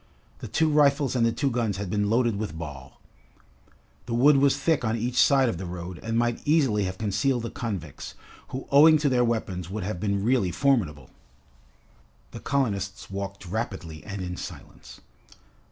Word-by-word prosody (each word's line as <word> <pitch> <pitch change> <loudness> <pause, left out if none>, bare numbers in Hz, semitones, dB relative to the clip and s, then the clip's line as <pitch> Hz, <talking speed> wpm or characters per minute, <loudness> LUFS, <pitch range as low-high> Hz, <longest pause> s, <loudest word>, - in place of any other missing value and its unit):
The - - -7
two 160 - +1
rifles 140 -3 +3
and 120 - +2
the 115 - +3
two 140 +3 -1
guns 115 -5 -1
had 100 -2 -4
been 105 -1 0
loaded 115 -1 +2
with 100 -6 -4
ball. 70 -5 -9 1.1
The 115 - -2
wood 140 +4 +5
was 140 0 +3
thick 160 -5 +1
on 110 0 0
each 120 +2 -3
side 135 -2 +4
of 95 -8 -2
the 95 - -5
road 90 0 -7
and 115 0 -2
might 120 0 0
easily 135 -10 +2
have 95 0 -4
concealed 110 +5 0
the 115 - -5
convicts, 95 - -6 0.3
who 130 +1 -6
owing 155 +3 +7
to 145 -1 +1
their 125 -2 +3
weapons 95 -7 -2
would 105 +1 -4
have 95 -2 -4
been 100 0 -1
really 120 -5 +2
formidable. 85 - 0 1.2
The - - -8
colonists 100 -9 -2
walked 100 0 -6
rapidly 90 -6 -5
and 100 -2 -6
in 90 0 -5
silence. - - -10
110 Hz, 175 wpm, -26 LUFS, 95-130 Hz, 1.2 s, owing